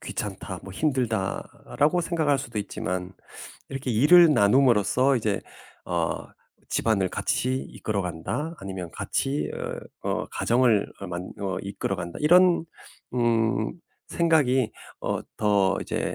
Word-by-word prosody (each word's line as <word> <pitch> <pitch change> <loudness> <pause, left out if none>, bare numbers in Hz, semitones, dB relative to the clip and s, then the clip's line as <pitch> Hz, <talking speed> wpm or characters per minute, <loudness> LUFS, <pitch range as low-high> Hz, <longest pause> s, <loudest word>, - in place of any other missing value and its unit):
'귀찮다, - - -5
뭐 95 - -9
힘들다.'라고 130 - 0
생각할 160 -5 +1
수도 115 -4 -5
있지만 90 -2 -4 0.6
이렇게 135 -1 -4
일을 150 +8 +7
나눔으로써 125 +3 +4
이제 105 -4 -1 0.4
어 - - 0 0.6
'집안을 100 -5 +1
같이 130 +7 -1
이끌어 105 -2 -3
간다.' 90 - -4
아니면 95 -3 -6
같이 140 +2 -2 0.5
어 - - -3
어 - - -1
'가정을 120 -4 +2
어 100 - -5
만 90 +1 -5
어 95 -2 -2
이끌어 100 -1 -3
간다.' 85 -1 -6
이런 175 +1 +5 0.5
음 115 -2 +1 0.4
생각이 140 -8 +2 0.3
어 - - -1 0.2
더 100 -2 +2
이제 - - -2
115 Hz, 255 characters per minute, -26 LUFS, 100-140 Hz, 0.6 s, 일을